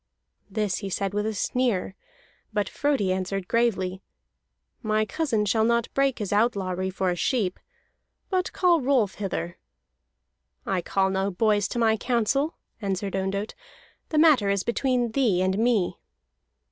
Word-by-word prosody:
This 205 -2 -1
he 200 - -5
said 195 +1 -2
with 210 +1 0
a 220 - -1
sneer: 230 -3 0 0.6
but 210 -2 0
Frodi 275 -10 0
answered 190 0 -3
gravely: 190 -5 0 0.8
"My 215 0 +1
cousin 225 -5 0
shall 220 +2 +2
not 235 0 +1
break 275 -1 +2
his 205 -3 -3
outlawry 190 -4 +1
for 190 -1 -1
a - - -1
sheep. 195 0 0 0.7
But 370 -1 0
call 350 -4 +3
Rolf 250 -7 +2
hither." 175 -3 -3 1.1
"I 190 -2 0
call 190 +2 +1
no 190 +1 0
boys 205 +1 +2
to - - -5
my 220 -2 +3
counsel," 255 +6 0 0.3
answered 195 -1 -2
Ondott. 195 +2 -2 0.6
"The 310 - -1
matter 300 -10 +5
is 200 -1 +1
between 245 -1 0
thee 225 -8 +2
and 190 +2 0
me." 225 -6 +1
210 Hz, 145 wpm, -26 LUFS, 190-240 Hz, 1.1 s, matter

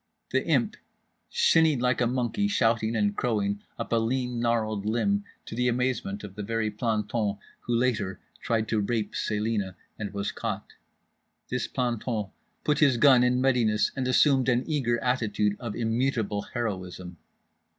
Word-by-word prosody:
The - - +2
Imp - - +1 0.5
shinnied 165 - +4
like 125 0 +1
a 120 - +3
monkey, 130 - 0
shouting 115 - +1
and 105 -2 +1
crowing, 105 -4 0 0.2
up - - -4
a - - +4
lean 125 +1 -1
gnarled 110 -3 0
limb—to 200 - -2
the 125 +2 +1
amazement 125 -5 -1
of 100 -3 -8
the 105 - -6
very 110 +1 -1
planton 105 -1 -1 0.2
who 120 - -2
later 115 -6 0 0.2
tried 110 -1 0
to 110 - +1
rape 105 0 -1
Celina 105 -3 -1 0.2
and 105 -2 -4
was 100 0 -2
caught. - - -5 0.8
This 125 -1 -1
planton 120 -5 -2 0.3
put 150 -1 +1
his 140 -5 +4
gun 125 0 +6
in 125 +1 +2
readiness 120 -5 +2
and 130 -2 -1
assumed 130 0 +4
an 125 0 +2
eager 130 -7 +1
attitude 110 -5 +1
of 115 -4 -5
immutable 115 -3 0
heroism. 90 -6 -4
115 Hz, 150 wpm, -27 LUFS, 105-125 Hz, 0.8 s, gun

